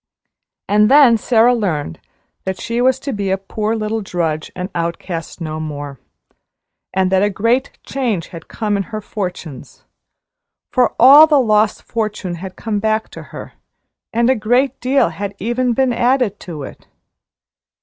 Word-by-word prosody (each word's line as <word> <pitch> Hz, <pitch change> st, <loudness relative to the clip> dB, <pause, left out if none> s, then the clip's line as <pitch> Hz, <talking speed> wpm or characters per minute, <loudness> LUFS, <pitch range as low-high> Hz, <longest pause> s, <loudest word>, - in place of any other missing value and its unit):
And 210 Hz, +1 st, +4 dB
then 275 Hz, -4 st, +7 dB
Sara 230 Hz, +1 st, +3 dB
learned 160 Hz, -, -2 dB, 0.4 s
that 190 Hz, -1 st, -4 dB
she 235 Hz, +1 st, -2 dB
was 260 Hz, +1 st, +3 dB
to 280 Hz, -, -4 dB
be 200 Hz, -2 st, -2 dB
a 190 Hz, -, +1 dB
poor 210 Hz, +3 st, -3 dB
little 220 Hz, 0 st, -2 dB
drudge 165 Hz, -5 st, -3 dB
and 180 Hz, +1 st, -5 dB
outcast 170 Hz, 0 st, -4 dB
no 155 Hz, -2 st, -5 dB
more, 145 Hz, -3 st, -6 dB, 0.9 s
and 190 Hz, -1 st, 0 dB
that 190 Hz, 0 st, +3 dB
a 205 Hz, -, +2 dB
great 230 Hz, +7 st, 0 dB
change 235 Hz, -11 st, -2 dB
had 165 Hz, -2 st, -10 dB
come 210 Hz, -2 st, -2 dB
in 195 Hz, -, -1 dB
her 215 Hz, -2 st, -4 dB
fortunes; 180 Hz, -, -7 dB, 0.9 s
for 250 Hz, -2 st, +2 dB
all 280 Hz, +6 st, +9 dB
the 300 Hz, -3 st, +4 dB
lost 215 Hz, -3 st, +2 dB
fortune 215 Hz, -5 st, -3 dB
had 185 Hz, +2 st, -8 dB
come 215 Hz, -3 st, -3 dB
back 220 Hz, +1 st, -1 dB
to -, -, -10 dB
her, -, -, -9 dB, 0.6 s
and 235 Hz, +1 st, +1 dB
a 260 Hz, -, +4 dB
great 245 Hz, +4 st, +1 dB
deal 260 Hz, -4 st, +2 dB
had 200 Hz, +5 st, -6 dB
even 240 Hz, +4 st, -1 dB
been 260 Hz, 0 st, +1 dB
added 240 Hz, -3 st, +1 dB
to 155 Hz, -5 st, -7 dB
it. -, -, -11 dB
210 Hz, 160 wpm, -18 LUFS, 180-240 Hz, 0.9 s, all